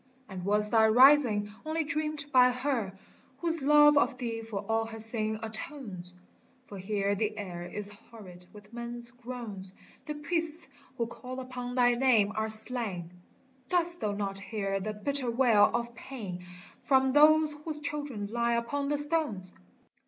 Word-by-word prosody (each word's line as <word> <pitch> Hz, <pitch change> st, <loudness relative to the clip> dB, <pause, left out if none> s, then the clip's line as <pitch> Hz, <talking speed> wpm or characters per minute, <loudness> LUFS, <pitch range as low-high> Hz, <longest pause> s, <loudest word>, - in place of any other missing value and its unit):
And 190 Hz, -3 st, -8 dB
was 210 Hz, +2 st, 0 dB
thy 220 Hz, -1 st, +5 dB
Rising 240 Hz, -4 st, +5 dB
only 320 Hz, +1 st, -2 dB
dreamed 305 Hz, -1 st, -2 dB
by 250 Hz, -1 st, +6 dB
Her 250 Hz, -6 st, -2 dB, 0.4 s
Whose 330 Hz, 0 st, +1 dB
love 295 Hz, +1 st, +6 dB
of 270 Hz, -3 st, 0 dB
thee 230 Hz, -2 st, -4 dB
for 210 Hz, -3 st, -6 dB
all 225 Hz, 0 st, 0 dB
her 225 Hz, 0 st, -9 dB
sin 220 Hz, -1 st, 0 dB
atones? 215 Hz, -6 st, -6 dB, 0.5 s
For 200 Hz, -4 st, -10 dB
here 200 Hz, +1 st, -1 dB
the 215 Hz, +1 st, -2 dB
air 175 Hz, -4 st, -6 dB
is 205 Hz, +1 st, -3 dB, 0.2 s
horrid 180 Hz, -6 st, -13 dB
with 210 Hz, +1 st, -16 dB
men's 235 Hz, 0 st, -2 dB
groans, 235 Hz, -6 st, -8 dB, 0.3 s
The 300 Hz, -, -4 dB
priests 325 Hz, +2 st, -3 dB, 0.3 s
who 235 Hz, -, 0 dB
call 255 Hz, +2 st, -8 dB
upon 250 Hz, -1 st, -6 dB
thy 245 Hz, -1 st, +4 dB
name 235 Hz, -5 st, +3 dB
are 220 Hz, 0 st, -2 dB
slain, 215 Hz, -6 st, +3 dB, 0.6 s
Dost 345 Hz, -1 st, +1 dB
thou 210 Hz, -1 st, -2 dB
not 200 Hz, -1 st, -3 dB
hear 195 Hz, 0 st, -3 dB
the 215 Hz, +3 st, -4 dB
bitter 265 Hz, +4 st, -1 dB
wail 230 Hz, -4 st, +4 dB
of 235 Hz, 0 st, -3 dB
pain 200 Hz, -9 st, -8 dB, 0.3 s
From 265 Hz, -1 st, +2 dB
those 305 Hz, +1 st, +5 dB
whose 305 Hz, -2 st, -4 dB
children 290 Hz, -7 st, -5 dB
lie 235 Hz, +3 st, -1 dB
upon 280 Hz, +5 st, -2 dB
the 295 Hz, -, 0 dB
stones 290 Hz, -, 0 dB
235 Hz, 155 wpm, -29 LUFS, 205-280 Hz, 0.6 s, by